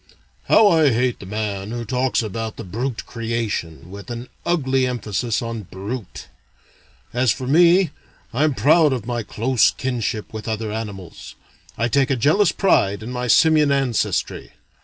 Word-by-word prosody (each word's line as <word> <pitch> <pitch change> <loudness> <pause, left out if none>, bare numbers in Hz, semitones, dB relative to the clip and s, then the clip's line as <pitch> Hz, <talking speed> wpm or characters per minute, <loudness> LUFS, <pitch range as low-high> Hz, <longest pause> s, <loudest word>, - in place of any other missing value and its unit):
"How 220 - +6
I 160 -6 +4
hate 125 0 0
the 95 - -10
man 100 -1 -3
who 120 0 -4
talks 125 +1 0
about 110 +1 -5
the - - -6
'brute 115 +6 -4
creation,' 115 -8 -4
with 100 +3 -10
an 120 +1 -6 0.2
ugly 135 -6 +1
emphasis 120 -1 -2
on 115 -1 -4
brute.... 100 +4 -7 0.9
As 125 -1 +2
for 130 - -4
me, 170 +4 +4 0.4
I 130 +6 +1
am 150 -3 +1
proud 150 +5 +4
of 125 - -4
my 120 -1 -2
close 115 +2 +2
kinship 120 -4 -3
with 110 0 -7
other 110 -1 -3
animals. 105 -5 -7 0.4
I 115 - +1
take 135 +2 +2
a 135 - +2
jealous 155 - +3
pride 100 - +1
in 120 - -6
my 125 0 -3
Simian 150 +5 +4
ancestry. 135 -5 -1
120 Hz, 160 wpm, -21 LUFS, 110-135 Hz, 0.9 s, How